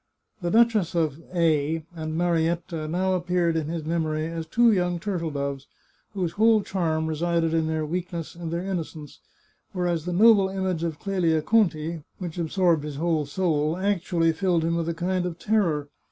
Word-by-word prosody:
The 175 Hz, -, -1 dB
duchess 220 Hz, -5 st, +3 dB
of 160 Hz, -2 st, 0 dB
A 160 Hz, -2 st, +1 dB
and 155 Hz, -1 st, -4 dB
Marietta 170 Hz, -1 st, 0 dB
now 185 Hz, +4 st, 0 dB
appeared 175 Hz, -2 st, +1 dB
in 160 Hz, -2 st, -1 dB
his 165 Hz, -1 st, -4 dB
memory 155 Hz, -1 st, -1 dB
as 165 Hz, 0 st, -5 dB
two 235 Hz, +7 st, +4 dB
young 180 Hz, -3 st, +1 dB
turtle 175 Hz, -3 st, -2 dB
doves, 140 Hz, -2 st, -4 dB, 0.5 s
whose 180 Hz, -4 st, -1 dB
whole 215 Hz, +3 st, +4 dB
charm 160 Hz, -5 st, -1 dB
resided 165 Hz, +1 st, 0 dB
in 160 Hz, -1 st, +1 dB
their 160 Hz, -1 st, -1 dB
weakness 170 Hz, 0 st, -4 dB
and 170 Hz, -1 st, -6 dB
their 170 Hz, +2 st, -2 dB
innocence, 160 Hz, -5 st, -5 dB, 0.5 s
whereas 175 Hz, -3 st, -1 dB
the 180 Hz, -, -2 dB
noble 205 Hz, 0 st, +6 dB
image 190 Hz, -3 st, -2 dB
of 165 Hz, -3 st, -2 dB
Clelia 170 Hz, -5 st, 0 dB
Conti, 170 Hz, -7 st, +1 dB, 0.2 s
which 175 Hz, -2 st, -6 dB
absorbed 170 Hz, -2 st, +2 dB
his 150 Hz, -1 st, -5 dB
whole 160 Hz, -1 st, 0 dB
soul, 155 Hz, -1 st, 0 dB
actually 175 Hz, -4 st, +1 dB
filled 170 Hz, 0 st, +1 dB
him 165 Hz, +1 st, 0 dB
with 170 Hz, 0 st, -1 dB
a 170 Hz, -, -2 dB
kind 180 Hz, +1 st, -1 dB
of 170 Hz, -2 st, -6 dB
terror. 175 Hz, -9 st, +1 dB
170 Hz, 170 wpm, -25 LUFS, 160-180 Hz, 0.5 s, noble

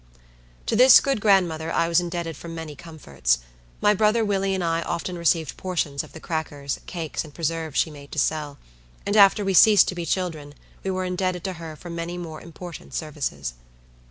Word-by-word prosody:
To -, -, 0 dB
this 250 Hz, +2 st, +9 dB
good 270 Hz, -6 st, -1 dB
grandmother 175 Hz, -6 st, +2 dB
I 165 Hz, -, +1 dB
was 170 Hz, 0 st, +4 dB
indebted 170 Hz, -2 st, -4 dB
for 170 Hz, -, -10 dB
many 165 Hz, -2 st, -7 dB
comforts. 70 Hz, -, -1 dB, 0.4 s
My 210 Hz, -, +5 dB
brother 215 Hz, +2 st, +2 dB
Willie 195 Hz, -1 st, 0 dB
and 185 Hz, -, -2 dB
I 165 Hz, 0 st, 0 dB
often 175 Hz, +2 st, -3 dB
received 170 Hz, -2 st, +1 dB
portions 165 Hz, -7 st, -2 dB
of -, -, -14 dB
the -, -, -9 dB
crackers, 150 Hz, -4 st, -4 dB
cakes, 165 Hz, -4 st, -4 dB
and 155 Hz, -, -12 dB
preserves, 165 Hz, -2 st, -2 dB
she 160 Hz, -, +2 dB
made 140 Hz, -1 st, -12 dB
to -, -, -7 dB
sell; 150 Hz, -1 st, -1 dB, 0.5 s
and 205 Hz, -, 0 dB
after 200 Hz, 0 st, +6 dB
we 195 Hz, -, +1 dB
ceased 210 Hz, +2 st, +7 dB
to -, -, -3 dB
be 170 Hz, -1 st, -4 dB
children 155 Hz, -6 st, -3 dB, 0.3 s
we 195 Hz, -, -2 dB
were 185 Hz, 0 st, -1 dB
indebted 180 Hz, -1 st, -2 dB
to 190 Hz, -1 st, -3 dB
her 165 Hz, -2 st, -8 dB
for 175 Hz, +3 st, -10 dB
many 170 Hz, +1 st, -4 dB
more 160 Hz, -3 st, -7 dB
important 170 Hz, 0 st, -10 dB
services. 135 Hz, -, -4 dB
170 Hz, 190 wpm, -24 LUFS, 155-185 Hz, 0.5 s, this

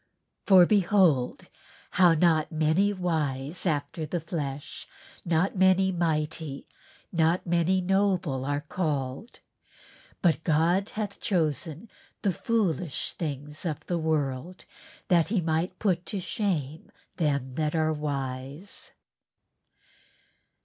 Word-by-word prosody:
"For 185 Hz, -3 st, +8 dB
behold.... 180 Hz, -9 st, +2 dB, 0.4 s
how 175 Hz, -3 st, +5 dB
that -, -, -2 dB
not 160 Hz, -1 st, +3 dB
many 160 Hz, +6 st, +2 dB
wise 160 Hz, -4 st, -1 dB
after 155 Hz, +1 st, -1 dB
the 175 Hz, +3 st, -2 dB
flesh, 150 Hz, -3 st, -5 dB, 0.4 s
not 175 Hz, +4 st, +1 dB
many 190 Hz, 0 st, +4 dB
mighty, 155 Hz, -4 st, -2 dB, 0.4 s
not 165 Hz, +1 st, +2 dB
many 175 Hz, +2 st, +2 dB
noble 185 Hz, -7 st, +1 dB
are 145 Hz, +1 st, -1 dB
called. 150 Hz, -, -3 dB, 0.8 s
But 165 Hz, -2 st, +2 dB
God 170 Hz, +6 st, +2 dB
hath 205 Hz, -2 st, -4 dB
chosen 165 Hz, -, -1 dB, 0.4 s
the 195 Hz, -, +2 dB
foolish 180 Hz, -, -1 dB
things 150 Hz, -1 st, -5 dB
of 160 Hz, -5 st, -4 dB
the 175 Hz, -1 st, -1 dB
world 155 Hz, +1 st, -2 dB, 0.4 s
that 170 Hz, -3 st, +4 dB
he 210 Hz, -1 st, +1 dB
might 165 Hz, +2 st, -1 dB
put 180 Hz, -4 st, 0 dB
to 200 Hz, -, -3 dB
shame 165 Hz, -7 st, -3 dB, 0.3 s
them 140 Hz, -5 st, 0 dB
that 155 Hz, +2 st, -1 dB
are 155 Hz, -1 st, +2 dB
wise." 140 Hz, +3 st, -4 dB
165 Hz, 110 wpm, -27 LUFS, 150-185 Hz, 0.8 s, For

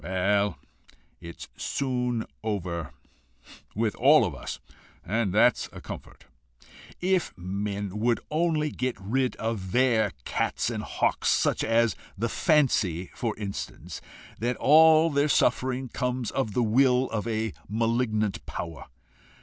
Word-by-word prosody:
Well, 95 Hz, +2 st, +1 dB, 0.6 s
it's 85 Hz, -1 st, -9 dB
soon 125 Hz, -4 st, -2 dB, 0.2 s
over 85 Hz, -8 st, -3 dB, 0.8 s
with 110 Hz, -1 st, 0 dB
all -, -, +6 dB
of -, -, -3 dB
us, -, -, -6 dB, 0.5 s
and 110 Hz, -1 st, 0 dB
that's -, -, +3 dB
a -, -, -10 dB
comfort. -, -, -10 dB, 0.8 s
If 185 Hz, -, 0 dB
men 100 Hz, +2 st, -4 dB
would 120 Hz, +1 st, +2 dB
only 155 Hz, -1 st, +1 dB
get 130 Hz, -1 st, -2 dB
rid 125 Hz, +7 st, -1 dB
of 110 Hz, -5 st, -4 dB
their 120 Hz, -5 st, +3 dB
cats -, -, -1 dB
and -, -, -3 dB
hawks, -, -, 0 dB
such -, -, +2 dB
as 115 Hz, 0 st, +2 dB, 0.2 s
the 115 Hz, +4 st, -1 dB
fancy 110 Hz, -, +1 dB
for 115 Hz, -3 st, -3 dB
instance, 100 Hz, -2 st, -6 dB, 0.4 s
that 120 Hz, +2 st, -1 dB
all 160 Hz, +2 st, +6 dB
their 145 Hz, +1 st, +2 dB
suffering 130 Hz, 0 st, +1 dB
comes 125 Hz, -2 st, -2 dB
of 110 Hz, -6 st, -2 dB
the 125 Hz, -, +2 dB
will 125 Hz, +3 st, +3 dB
of 115 Hz, 0 st, -2 dB
a 110 Hz, -2 st, -1 dB, 0.2 s
malignant 110 Hz, -1 st, 0 dB
power! 85 Hz, -2 st, -6 dB
115 Hz, 125 wpm, -27 LUFS, 100-130 Hz, 0.8 s, all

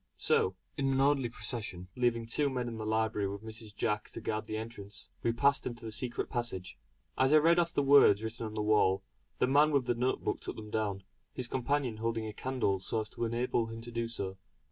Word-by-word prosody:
So, 95 Hz, -, +2 dB, 0.2 s
in 135 Hz, -1 st, +1 dB
an 135 Hz, -, +1 dB
orderly 135 Hz, -3 st, +3 dB
procession, 105 Hz, -5 st, -4 dB
leaving 120 Hz, -2 st, +1 dB
two 140 Hz, +5 st, +1 dB
men 125 Hz, -2 st, -2 dB
in 115 Hz, -2 st, -5 dB
the 110 Hz, -, -4 dB
library 110 Hz, -2 st, +1 dB
with 100 Hz, +2 st, -6 dB
Mrs. 110 Hz, -1 st, -7 dB
Jack 105 Hz, 0 st, -1 dB
to -, -, -7 dB
guard 110 Hz, 0 st, -2 dB
the 110 Hz, -, -3 dB
entrance, 105 Hz, -2 st, -7 dB
we 115 Hz, -, +2 dB
passed 140 Hz, +4 st, +2 dB
into 120 Hz, -1 st, -6 dB
the 110 Hz, -, -4 dB
secret 120 Hz, +2 st, -1 dB
passage. 115 Hz, -7 st, -3 dB, 0.4 s
As 130 Hz, +2 st, +4 dB
I -, -, +10 dB
read 165 Hz, +3 st, +5 dB
off 170 Hz, -1 st, +1 dB
the 145 Hz, -, +1 dB
words 135 Hz, -7 st, +6 dB
written 110 Hz, 0 st, -4 dB
on 110 Hz, -, -8 dB
the 105 Hz, -, -1 dB
wall, 100 Hz, -3 st, +3 dB, 0.3 s
the -, -, +3 dB
man 145 Hz, +4 st, +5 dB
with 140 Hz, -4 st, +2 dB
the 120 Hz, -, +2 dB
note 125 Hz, +2 st, 0 dB
book -, -, -1 dB
took -, -, -5 dB
them 105 Hz, -1 st, -9 dB
down, 100 Hz, -3 st, -1 dB, 0.3 s
his 125 Hz, -, -1 dB
companion 130 Hz, -2 st, 0 dB
holding 115 Hz, 0 st, -1 dB
a 110 Hz, -, -5 dB
candle 125 Hz, -6 st, 0 dB
so 110 Hz, +4 st, -1 dB
as 105 Hz, -, -6 dB
to 120 Hz, -, -3 dB
enable 115 Hz, 0 st, 0 dB
him 115 Hz, 0 st, -7 dB
to 120 Hz, +1 st, -8 dB
do 115 Hz, 0 st, -1 dB
so. 100 Hz, -4 st, -5 dB
115 Hz, 230 wpm, -32 LUFS, 110-125 Hz, 0.4 s, I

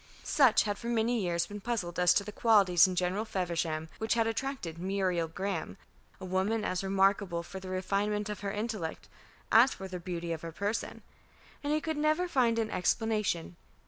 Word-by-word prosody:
Sutch 265 Hz, -7 st, +4 dB
had 205 Hz, -2 st, -3 dB
for 235 Hz, -, -6 dB
many 235 Hz, 0 st, +1 dB
years 170 Hz, -2 st, 0 dB
been 205 Hz, 0 st, -8 dB
puzzled 190 Hz, -7 st, -3 dB
as 180 Hz, -1 st, +5 dB
to 200 Hz, -, +3 dB
the 210 Hz, -, -7 dB
qualities 195 Hz, -6 st, +5 dB
in 185 Hz, -, -3 dB
General 180 Hz, +4 st, 0 dB
Feversham 170 Hz, -6 st, -2 dB
which 220 Hz, 0 st, +1 dB
had 230 Hz, -1 st, +2 dB
attracted 225 Hz, -, -3 dB
Muriel 185 Hz, -2 st, 0 dB
Graham, 180 Hz, 0 st, -4 dB, 0.4 s
a 190 Hz, -, -7 dB
woman 190 Hz, +4 st, 0 dB
as 185 Hz, +1 st, -1 dB
remarkable 195 Hz, -2 st, +1 dB
for 190 Hz, +2 st, -8 dB
the 190 Hz, 0 st, -8 dB
refinement 200 Hz, +3 st, -1 dB
of 210 Hz, -1 st, -5 dB
her 200 Hz, -1 st, -3 dB
intellect 210 Hz, -6 st, -4 dB, 0.4 s
as 235 Hz, +4 st, +6 dB
for 190 Hz, -, -7 dB
the 185 Hz, -1 st, -6 dB
beauty 170 Hz, -1 st, -4 dB
of 160 Hz, -, -6 dB
her 165 Hz, -, -6 dB
person; 205 Hz, +6 st, -3 dB, 0.6 s
and 290 Hz, -, -1 dB
he 305 Hz, -, +2 dB
could 315 Hz, 0 st, -3 dB
never 310 Hz, +4 st, +2 dB
find 245 Hz, -8 st, +2 dB
an 225 Hz, -1 st, -1 dB
explanation. 205 Hz, -4 st, 0 dB
195 Hz, 185 wpm, -30 LUFS, 180-225 Hz, 0.6 s, as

